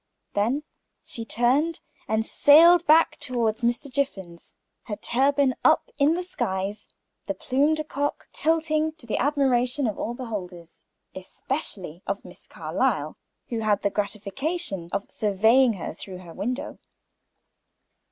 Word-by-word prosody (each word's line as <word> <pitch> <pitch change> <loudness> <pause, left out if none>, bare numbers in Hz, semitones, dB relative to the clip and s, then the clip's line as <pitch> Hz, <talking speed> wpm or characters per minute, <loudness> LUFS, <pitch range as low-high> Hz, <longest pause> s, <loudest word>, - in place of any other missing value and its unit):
Then 235 +9 0 0.4
she 230 - -6
turned 265 +9 +1 0.3
and 220 0 0
sailed 340 +6 +6
back 315 0 +5
toward 235 -4 0
Mr. 240 +4 0
Jiffin's, 195 -11 -4 0.3
her 210 - -4
turban 270 +4 +2
up - - +3
in 290 +3 +4
the 360 - -2
skies 205 - -3
and - - -38
the - - -2
plume 285 +4 +2
de 310 - -2
coq 290 -1 -3
tossing 315 -1 +1
to 315 -6 -9
the 225 - -2
admiration 265 -1 +1
of 215 -3 -2
all 235 - -3
beholders, 185 -9 -7 0.3
especially 185 - -5
of 200 0 -3
Miss - - -12
Carlyle, - - -1 0.3
who 230 - -2
had 210 -2 +1
the 200 - +1
gratification 205 - -2
of 200 +1 -4
surveying 225 +5 +3
her 185 - -6
from 185 +2 -9
her 175 -2 -11
window. 250 +9 -4
240 Hz, 135 wpm, -25 LUFS, 205-290 Hz, 0.4 s, sailed